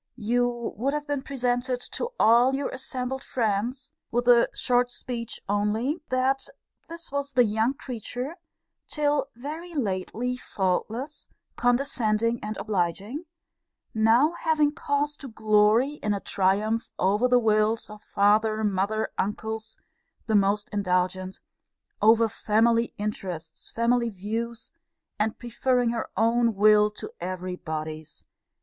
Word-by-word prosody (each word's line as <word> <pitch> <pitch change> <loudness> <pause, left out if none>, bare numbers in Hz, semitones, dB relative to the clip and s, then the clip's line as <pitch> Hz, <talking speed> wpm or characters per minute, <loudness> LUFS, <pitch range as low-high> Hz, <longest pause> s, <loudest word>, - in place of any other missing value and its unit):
You 240 +1 0
would 275 +6 0
have 295 0 -3
been 290 -2 -2
presented 250 -1 -1
to 475 - -3
all 240 +4 +5
your 280 0 -2
assembled 265 0 -4
friends, 245 +5 -2 0.2
with 240 +1 -1
a 240 -1 +6
short 245 0 +1
speech 235 -2 -4
only, 215 - 0
'That 260 +1 +1 0.4
this 335 -2 -7
was 280 0 -2
the 250 -1 +5
young 220 +4 +1
creature, 255 - -5 0.5
till 295 -2 0
very 315 +7 -7
lately 235 +1 -2
faultless, 225 +8 -2 0.3
condescending, 235 -3 +1
and 215 +1 -4
obliging; 205 - -2 0.7
now 225 +7 +4
having 305 -2 +2
cause 290 0 -1
to 275 - -9
glory 220 +5 +3
in 210 -1 0
a - - -3
triumph 205 +4 0
over 205 +6 +2
the 250 0 +5
wills 220 -1 +2
of 210 0 -11
father, 215 +2 +2
mother, 205 +2 0
uncles, 220 +2 -3 0.5
the 220 - -1
most 205 0 +3
indulgent; 185 -1 -1 0.6
over 225 +2 +6
family 225 +2 +2
interests, 185 -6 -5
family 235 +1 +1
views; 225 +4 -5 0.5
and 215 +1 0
preferring 245 0 0
her 235 -1 -3
own 230 +1 +3
will 210 +1 +5
to 210 - -9
every 185 0 -4
body's! 155 -2 -6
230 Hz, 125 wpm, -26 LUFS, 210-255 Hz, 0.7 s, a